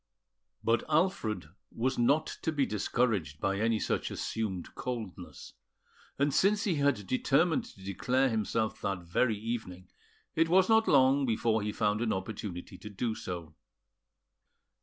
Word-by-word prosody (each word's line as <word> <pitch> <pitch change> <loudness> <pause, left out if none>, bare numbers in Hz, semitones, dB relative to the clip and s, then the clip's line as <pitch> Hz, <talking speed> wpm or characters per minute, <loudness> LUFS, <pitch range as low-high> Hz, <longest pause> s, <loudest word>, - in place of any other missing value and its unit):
But 115 0 +2
Alfred 135 - 0 0.2
was 130 +3 -1
not 140 +6 +3 0.2
to 160 - 0
be 145 -3 +1
discouraged 105 - 0
by 100 +3 0
any 115 0 +2
such - - -1
assumed 100 -6 -4
coldness; 110 -8 -6 0.6
and 140 0 +1
since 205 +1 +3
he 180 -7 0
had 140 -8 +1
determined 145 - +2
to 95 - -14
declare 125 +7 +1
himself 110 0 -1
that 95 -3 -2
very 105 +6 +1
evening, 100 -5 -5 0.4
it 165 0 +2
was 185 +2 +5
not 225 0 +5
long 135 0 +4
before 110 -1 +1
he 105 +1 -2
found 105 0 0
an 115 -2 +1
opportunity 95 -2 -6
to 105 - -8
do 110 +3 -2
so. 90 -7 -6
115 Hz, 140 wpm, -30 LUFS, 100-135 Hz, 0.6 s, was